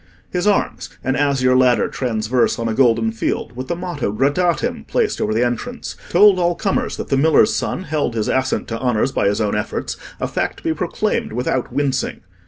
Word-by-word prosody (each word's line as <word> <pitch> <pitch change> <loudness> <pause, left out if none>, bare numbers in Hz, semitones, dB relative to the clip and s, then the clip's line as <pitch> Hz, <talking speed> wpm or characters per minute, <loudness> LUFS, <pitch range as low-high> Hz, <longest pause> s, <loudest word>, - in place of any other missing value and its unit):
His 180 +2 -1
arms—an 165 -9 -1
azure 135 -3 +2
ladder 125 -1 +4
transverse 120 -1 0
on 115 - -2
a 115 - -1
golden 115 -2 +3
field, 115 +1 -3
with 130 +1 -5
the 170 - -1
motto 175 - -3
Gradatim 145 - 0
placed - - 0
over 105 - 0
the 115 +3 +2
entrance—told 200 - +1
all 175 0 +2
comers 195 +1 -1
that - - -6
the 135 - +2
miller's 155 +3 +4
son 185 - -2
held 145 -8 -1
his 110 -2 -1
ascent 130 0 0
to 115 0 -3
honours 125 0 +1
by 100 - +1
his 100 - +1
own 105 -2 0
efforts 105 - -3 0.2
a - - -1
fact - - -2
to - - -15
be - - +1
proclaimed - - -2
without 125 +1 -1
wincing. 135 -3 -1
130 Hz, 190 wpm, -19 LUFS, 115-160 Hz, 0.2 s, ladder